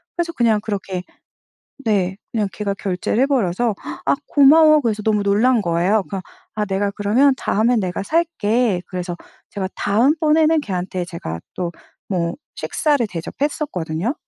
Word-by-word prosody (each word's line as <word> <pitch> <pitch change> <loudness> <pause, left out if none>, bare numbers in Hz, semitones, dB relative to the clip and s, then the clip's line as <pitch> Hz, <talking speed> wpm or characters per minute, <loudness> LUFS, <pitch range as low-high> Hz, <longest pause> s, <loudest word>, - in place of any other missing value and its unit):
그래서 345 -1 -1
그냥 230 -7 +2
그렇게 195 -3 -4 0.8
네. 190 -4 +1 0.2
그냥 215 -3 0
걔가 200 -1 -2
결제를 195 +3 -1
해버려서 240 -5 +1 0.3
"아. 140 - +4
고마워." 305 +2 +6
그래서 220 -5 -1
너무 210 -1 +1
놀란 220 +5 +3
거예요. 180 +4 +2
그러 195 -2 -4 0.3
"아. 210 - 0
내가 200 +1 0
그러면 220 +8 +3
다음에는 225 +3 +2
내가 185 -1 -3
살게." 240 - +1
그래서 180 -1 -4 0.3
제가 195 -2 -4
다음번에는 305 +8 +3
걔한테 185 -6 -3
제가 125 - -6 0.2
또 175 -2 -2 0.4
뭐 170 -3 -1 0.2
식사를 290 -5 0
대접했었거든요. 185 - -3
210 Hz, 325 characters per minute, -20 LUFS, 185-260 Hz, 0.8 s, 고마워